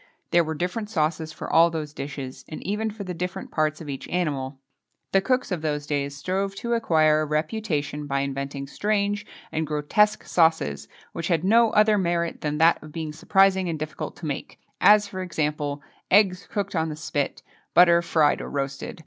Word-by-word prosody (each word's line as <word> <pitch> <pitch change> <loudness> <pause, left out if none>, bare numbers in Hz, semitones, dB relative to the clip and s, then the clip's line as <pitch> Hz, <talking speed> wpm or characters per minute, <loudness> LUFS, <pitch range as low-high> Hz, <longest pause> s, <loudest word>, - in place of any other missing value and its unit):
There 170 0 +5
were 160 0 -4
different 180 +6 -3
sauces 160 -3 -1
for - - -7
all 165 +1 +5
those 155 -3 -5
dishes, 135 -2 -6
and 155 - -8
even 210 +3 -1
for 210 -1 -7
the 185 -2 -5
different 180 +2 -5
parts 155 0 0
of 160 - -8
each 135 -2 -6
animal. 140 -6 -2 0.5
The 195 - +4
cooks 255 +2 0
of 175 -4 -1
those 150 -2 -2
days 140 -1 -2
strove 195 +5 -2
to 235 +4 -2
acquire 155 -9 +3
a - - 0
reputation 150 -2 -2
by 140 -1 0
inventing 140 0 -4
strange 205 +5 -1 0.2
and 160 0 -2
grotesque 180 +9 +2
sauces, 160 - +2 0.3
which 165 - -3
had 170 -3 +1
no 230 +4 +5
other 210 0 +4
merit 170 -2 -1
than 150 0 -2
that 165 +2 +4
of 155 - -11
being 155 -1 -5
surprising 190 +3 +3
and 160 - -2
difficult 155 0 -5
to 170 - -9
make, 145 -3 -5 0.2
as, 210 0 +6
for 185 -2 -6
example: 150 -4 -2 0.3
"eggs 190 -2 +4
cooked 200 -2 -3
on 160 -1 0
the 155 - -5
spit," 155 -2 -3 0.3
"butter 170 -1 +7
fried 160 -3 +2
or - - -6
roasted." 135 +1 -4
160 Hz, 185 wpm, -25 LUFS, 150-195 Hz, 0.5 s, butter